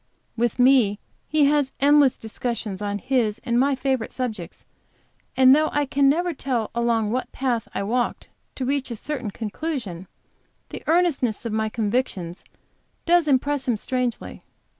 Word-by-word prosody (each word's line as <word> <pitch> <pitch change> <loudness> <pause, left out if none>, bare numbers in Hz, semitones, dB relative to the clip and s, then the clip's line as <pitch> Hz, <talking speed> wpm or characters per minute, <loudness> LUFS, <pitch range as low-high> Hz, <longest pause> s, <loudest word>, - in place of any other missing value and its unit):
With 235 0 0
me 250 -5 +4 0.3
he 305 -1 +3
has 285 -2 +2
endless 285 -1 +5
discussions 220 -3 -4
on 205 0 -2
his 235 -2 0
and 235 0 +1
my 275 +1 +3
favorite 265 -3 -1
subjects, 220 -9 -5 0.7
and 260 0 +7
though 310 +1 +2
I 290 0 +1
can 275 0 +3
never 345 +4 +1
tell 250 -6 -2
along 230 -2 +1
what 255 +2 -2
path 245 -4 -1
I - - -1
walked 240 +4 -1 0.3
to 260 - -3
reach 275 0 -1
a 235 - -4
certain 250 -1 -4
conclusion, 215 - -5 0.6
the - - -7
earnestness 315 -10 +1
of 230 - -3
my 220 0 0
convictions 210 -6 -2 0.6
does 345 -2 +4
impress 280 0 +1
him 240 -3 +1
strangely. 250 +1 -3
250 Hz, 150 wpm, -23 LUFS, 220-280 Hz, 0.7 s, and